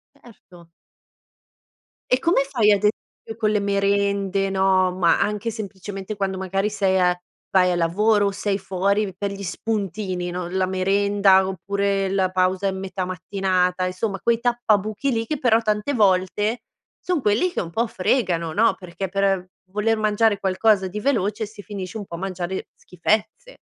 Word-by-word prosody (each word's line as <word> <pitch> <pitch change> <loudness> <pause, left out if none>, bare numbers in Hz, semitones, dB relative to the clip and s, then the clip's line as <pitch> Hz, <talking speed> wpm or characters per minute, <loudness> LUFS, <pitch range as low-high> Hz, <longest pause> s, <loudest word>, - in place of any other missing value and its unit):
Certo. 180 -10 -18 1.4
E 255 - +4
come 335 -3 +2
fai 230 -6 +3
ad 205 - +5
esempio 220 +1 -3
con 220 -2 +1
le 210 - +2
merende, 200 -1 +1
no, 190 -1 +2
ma 175 -2 +3
anche 210 +2 -1
semplicemente 200 -1 -6
quando 195 -1 -2
magari 195 +2 -1
sei 195 -2 +1
a 180 -1 +4 0.4
vai 180 -1 +4
al 175 - 0
lavoro 205 +5 +2
o - - 0
sei 195 0 -1
fuori 195 +1 0
per 200 +2 -3
gli 200 0 -7
spuntini, 195 -2 -3
no, 180 0 -4
la 185 +1 0
merenda, 195 +1 +3
oppure 195 +1 -1
la 190 -1 +1
pausa 185 +1 +1
in 190 -1 -2
metà 190 0 -4
mattinata, 185 0 0
insomma 195 +2 -3
quei 235 +1 +2
tappabuchi 235 0 0
lì 225 -2 -1
che 305 - -2
però 235 -4 +3
tante 215 +5 -1
volte 205 +1 +2 0.4
son 360 -5 -1
quelli 225 - +2
che - - -3
un 170 - -7
po' 230 +7 0
fregano, 185 -6 0
no, 215 0 +3
perché 180 +1 -6
per 195 -1 0 0.2
voler 215 +3 +1
mangiare 215 -1 +2
qualcosa 195 +1 +2
di 195 +3 -5
veloce 215 -4 0
si 210 0 -12
finisce 200 -1 -6
un 205 - -6
po' 170 - -8
a - - -7
mangiare 190 -1 -4
schifezze. 215 - -2
200 Hz, 160 wpm, -22 LUFS, 185-215 Hz, 1.4 s, ad